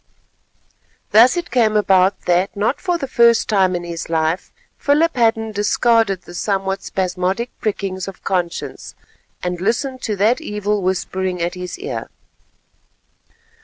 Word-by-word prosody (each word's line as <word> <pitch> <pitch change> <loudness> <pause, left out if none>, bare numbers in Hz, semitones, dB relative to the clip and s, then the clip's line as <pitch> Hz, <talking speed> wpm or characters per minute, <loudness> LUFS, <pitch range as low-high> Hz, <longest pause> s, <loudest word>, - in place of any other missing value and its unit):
Thus 240 - +6
it 345 - -4
came 225 -3 +3
about 195 -1 +3
that, 180 +3 +1
not 215 +7 0
for 355 -2 0
the 275 - -4
first 235 -2 +4
time 190 -4 +2
in 175 - -3
his 170 -1 -6
life, 160 +2 -1 0.3
Philip 310 +4 +2
Hadden 225 -2 +1
discarded 210 -1 +2
the 175 - -12
somewhat 195 +1 -1
spasmodic 190 +5 -2
prickings 195 -3 -2
of 195 - -9
conscience 180 -3 -3 0.5
and 180 -1 -3
listened 255 +5 -1
to 215 - -2
that 220 - +2
evil 210 -5 -2
whispering 185 0 -2
at 170 +1 -1
his 180 -1 -6
ear. 415 +6 -5
200 Hz, 135 wpm, -19 LUFS, 185-235 Hz, 0.5 s, Thus